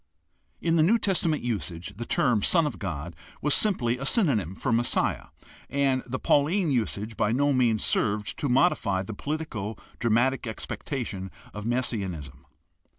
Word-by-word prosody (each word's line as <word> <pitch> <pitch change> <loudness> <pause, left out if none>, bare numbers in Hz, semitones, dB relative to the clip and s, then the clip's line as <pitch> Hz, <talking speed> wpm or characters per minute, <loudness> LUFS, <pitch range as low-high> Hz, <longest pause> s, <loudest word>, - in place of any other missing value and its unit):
In 165 0 +2
the - - +5
New 195 +9 +5
Testament 170 - +1
usage 90 -7 -3
the 120 - -5
term 125 -11 +2
"Son 165 - +3
of 150 - -4
God" 85 -3 -5 0.2
was 150 0 +1
simply 125 - +2
a 135 - -4
synonym 110 - +1
for 130 - -2
"Messiah," 120 +1 +1 0.4
and 135 -2 +1
the 130 +1 -2
Pauline 155 +6 +2
usage 110 -3 -1
by 105 0 +1
no 140 +4 +2
means 120 -4 +2
served 105 -1 +1
to 145 - -1
modify 120 - +2
the 110 - -6
politico 115 -6 -4 0.2
dramatic 120 +3 +2
expectation 110 -3 -4 0.2
of 105 +1 -5
messianism. 90 - -3
120 Hz, 150 wpm, -27 LUFS, 105-145 Hz, 0.4 s, the